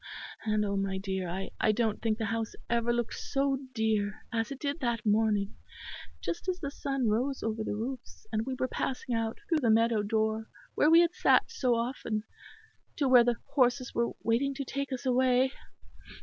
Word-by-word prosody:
And 215 -1 +1
oh, 200 0 -1
my 195 -1 -1
dear, 190 -2 -3 0.3
I 215 - +4
don't 220 -1 0
think 220 -1 +1
the 225 - -2
house 225 -1 -3 0.2
ever 235 0 +2
looked 240 -1 -1
so 275 -1 0 0.2
dear 215 -2 0
as 225 +1 0
it 275 - -6
did 290 +1 -2
that 235 -5 -1
morning, 210 -2 +2 0.7
just 170 - -4
as 365 0 -1
the 280 -4 -4
sun 275 -3 -1
rose 250 +6 0
over 220 0 -1
the 205 - -2
roofs, 245 +4 -6
and 220 -1 0
we 260 - -2
were 255 - 0
passing 255 0 -3
out 225 -1 -1
through 325 -4 +2
the 245 -6 +1
meadow 225 0 +4
door 220 +1 0 0.3
where 300 - +4
we 330 +1 +8
had 345 0 +2
sat - - +3
so 255 - +1
often, 230 -2 -2 0.7
to 280 - +1
where 250 -2 +8
the 240 0 +2 0.2
horses 255 -1 +2
were 235 0 +1
waiting 270 +5 +1
to 275 0 -4
take 275 +2 -3
us 260 0 -4
away." 255 0 +3
235 Hz, 190 wpm, -30 LUFS, 220-265 Hz, 0.7 s, we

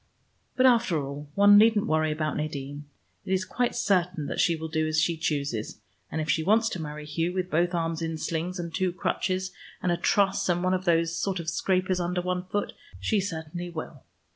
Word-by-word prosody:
But 255 - +3
after 235 -8 +4
all, 140 +1 -7
one 205 0 +8
needn't 220 -1 +4
worry 155 0 +1
about 155 0 -2
Nadine. 145 -1 -4 0.4
It 190 - -2
is 185 0 +1
quite 245 +4 -1
certain 180 -5 +1
that - - -4
she 170 - +3
will 160 0 -5
do 155 0 0
as 155 0 +1
she 165 +1 +2
chooses, 145 -10 -2 0.3
and 160 - -2
if 155 - -2
she 160 +1 +2
wants 220 +6 +3
to 180 - -4
marry 150 -1 -6
Hugh 165 +4 -1
with 185 -1 -2
both 175 +3 +2
arms 165 -1 -1
in 165 -1 -2
slings, 170 +3 -3
and 170 -2 -5
two 185 -1 0
crutches, 185 +1 -1 0.3
and 180 - 0
a 175 - +1
truss 195 +2 +2
and 175 0 +1
one 185 0 +2
of 185 0 -1
those 165 -1 +2
sort 190 +1 -1
of 165 -1 -3
scrapers 185 0 +1
under 180 +1 -1
one 180 0 -2
foot 205 +2 -2 0.3
she 215 - +1
certainly 175 -1 -5
will. 160 -4 -7
175 Hz, 210 wpm, -27 LUFS, 155-185 Hz, 0.4 s, one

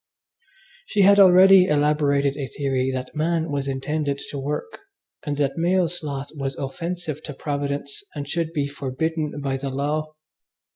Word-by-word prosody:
She 200 - +2
had 200 +1 +6
already 190 0 +8
elaborated 145 -2 +2
a 140 -2 -4
theory 130 -1 -1
that 130 +3 -5
man 160 0 0
was 140 -1 -2
intended 140 +2 -2
to 140 - -4
work, 150 - -4 0.5
and 145 -1 -1
that 145 +2 0
male 180 +1 +2
sloth 145 -5 -5
was 135 -2 -3
offensive 160 +2 -4
to 145 -3 -8
Providence 140 -1 -3
and 145 -1 -5
should 165 +1 -2
be 145 -4 -1
forbidden 145 +3 -3
by 135 -1 -1
the 135 +1 -4
law. 150 +3 -2
145 Hz, 150 wpm, -23 LUFS, 140-160 Hz, 0.5 s, already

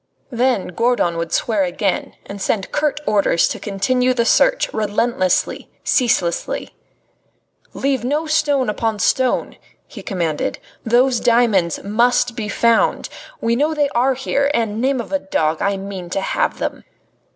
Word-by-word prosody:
Then 245 -5 0
Gourdon 230 -3 +1
would 165 0 -3
swear 215 -4 +1
again 190 +2 -2
and 200 0 -8
send 195 -2 -1
curt 300 -1 0
orders 200 -5 +2
to - - -4
continue 250 +6 0
the 235 -1 +1
search, - - +3
relentlessly, 210 -2 0
ceaselessly. 225 -9 0 1.0
"Leave 270 -2 -1
no 295 +6 -1
stone 295 -4 +1
upon 220 +1 -1
stone," 255 +5 0 0.3
he 210 - -11
commanded. 170 -6 -2 0.3
"Those 245 +2 +3
diamonds 225 -9 +2
must 235 +3 +2
be 215 -4 -4
found. 230 +2 +2 0.3
We 230 +1 +1
know 300 +5 +1
they 290 -2 +1
are 260 +2 +1
here, 280 +2 0
and, 220 -1 -1
name 265 0 +1
of 235 - -6
a 285 - +1
dog! 160 - -1
I 200 0 0
mean 190 -2 -7
to 195 - -2
have - - -1
them." - - -4
230 Hz, 145 wpm, -19 LUFS, 195-260 Hz, 1.0 s, search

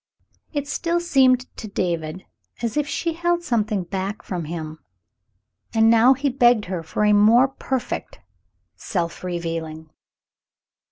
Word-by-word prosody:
It 285 -2 -3
still 335 +4 -1
seemed 265 -7 +4 0.2
to 220 - -6
David 175 -3 -3 0.4
as 230 - -1
if 295 -1 0
she 330 +2 -2
held 345 +1 0
something 215 - 0
back 195 +3 -4
from 175 -4 -4
him, 155 -1 -6 1.0
and 225 0 +5
now 235 +3 +6
he 280 +2 -1
begged 240 -4 +3
her 180 -2 -4
for 165 +6 -1
a 210 - +4
more 225 +5 +6
perfect 265 - -4 0.6
self 170 - -3
revealing. 165 -3 -5
215 Hz, 130 wpm, -22 LUFS, 175-265 Hz, 1.0 s, now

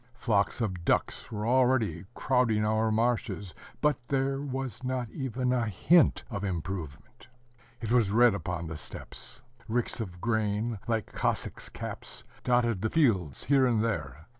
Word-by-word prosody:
Flocks 105 -2 +1
of 95 -6 -2
ducks - - 0
were 105 -1 -3
already 120 -8 +2
crowding 115 -5 +2
our 110 +1 +2
marshes, 110 -4 0 0.3
but 150 -3 +2
there 135 0 0
was 135 -2 -4
not 130 -1 -1
even 130 -2 -1
a 120 -2 +1
hint 135 - +4
of 100 - -3
improvement. 85 -5 -5 0.5
It 115 -1 -3
was 120 -5 +4
red 120 +2 +5
upon 90 -3 -3
the 80 -1 -5
steppes. - - -8 0.2
Ricks 120 +2 -1
of 90 -6 -5
grain, 110 0 0
like 115 -2 -1
Cossacks' - - -2
caps, - - -7 0.2
dotted 120 -5 +2
the 110 - 0
fields 100 - +2
here 135 -1 +4
and 115 -3 +2
there. 80 - -3
110 Hz, 145 wpm, -29 LUFS, 100-125 Hz, 0.5 s, red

